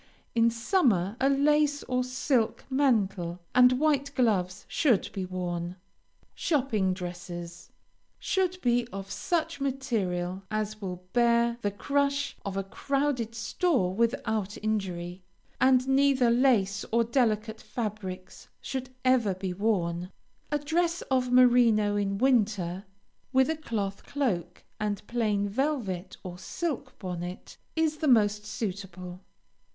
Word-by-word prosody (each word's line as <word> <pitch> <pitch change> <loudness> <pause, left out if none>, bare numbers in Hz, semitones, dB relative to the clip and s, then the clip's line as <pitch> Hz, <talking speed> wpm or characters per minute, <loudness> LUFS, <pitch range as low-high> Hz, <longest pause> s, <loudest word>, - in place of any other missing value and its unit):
In 230 0 +4
summer, 230 - +1
a 270 - +4
lace 290 +1 +3
or 250 0 0
silk 250 -2 0
mantle 200 -10 +1
and 250 0 +7
white 280 0 +2
gloves 190 -7 +1
should 255 - +2
be 190 -2 -3
worn. 175 -1 -4 0.6
SHOPPING 225 - +1
DRESSES 175 -1 -7 0.5
Should 370 -1 0
be 240 -1 +2
of 195 0 -7
such 335 -5 -1
material 195 -10 -1
as 215 0 -3
will 180 -2 -5
bear 235 0 +3
the 205 - +1
crush 280 +6 0
of 195 -1 -4
a 195 - 0
crowded 265 +1 -1
store 230 - +1
without 220 -2 0
injury, 185 -4 -2 0.4
and 260 0 +4
neither 270 -3 +4
lace 230 -6 +3
or 230 +1 +4
delicate 225 -2 0
fabrics 195 -5 -6
should 260 -1 -5 0.2
ever 240 -7 +3
be 185 -1 -4
worn. 180 -4 0 0.4
A 295 - +2
dress 335 +4 0
of 255 -1 +2
merino 240 -4 +5
in 200 -1 0
winter, 205 -7 +1 0.5
with 265 +3 +4
a - - -1
cloth 210 -10 -4
cloak 180 - -2 0.2
and 210 -1 -2
plain 210 -4 0
velvet 205 - -2
or 180 -1 -7
silk 330 - -4
bonnet 180 -1 -6 0.2
is 320 -1 +1
the 305 - -1
most 210 -4 +3
suitable. 185 -4 -5
225 Hz, 125 wpm, -28 LUFS, 190-265 Hz, 0.6 s, and